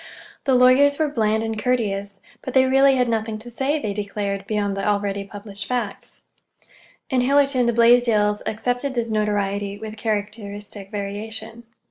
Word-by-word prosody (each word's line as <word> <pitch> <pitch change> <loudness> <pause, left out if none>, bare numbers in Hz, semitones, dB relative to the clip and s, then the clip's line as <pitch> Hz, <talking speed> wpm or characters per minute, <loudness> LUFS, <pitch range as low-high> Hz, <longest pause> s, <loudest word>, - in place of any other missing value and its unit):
The 265 -2 +3
lawyers 260 +3 +5
were 310 -2 +1
bland 220 -4 +1
and 225 -1 -3
courteous, 205 -5 -1 0.2
but 260 - -6
they 260 0 +6
really 270 +1 +5
had 250 -1 +2
nothing 220 -1 -1
to 235 +3 -7
say, 275 +5 0
they 210 -6 -3
declared, 200 -1 -3
beyond 205 -2 -1
the 195 - -3
already 200 -1 0
published 200 0 -8
facts. 240 -5 -4 0.9
In 255 -1 +3
Hillerton 275 -1 +3
the - - +3
Blaisdells 230 -3 +4
accepted 245 +5 -1
this 230 -1 -1
notoriety 205 -1 -1
with 220 +1 -8
characteristic 205 -2 -4
variation. 220 +3 -6
220 Hz, 150 wpm, -22 LUFS, 205-250 Hz, 0.9 s, they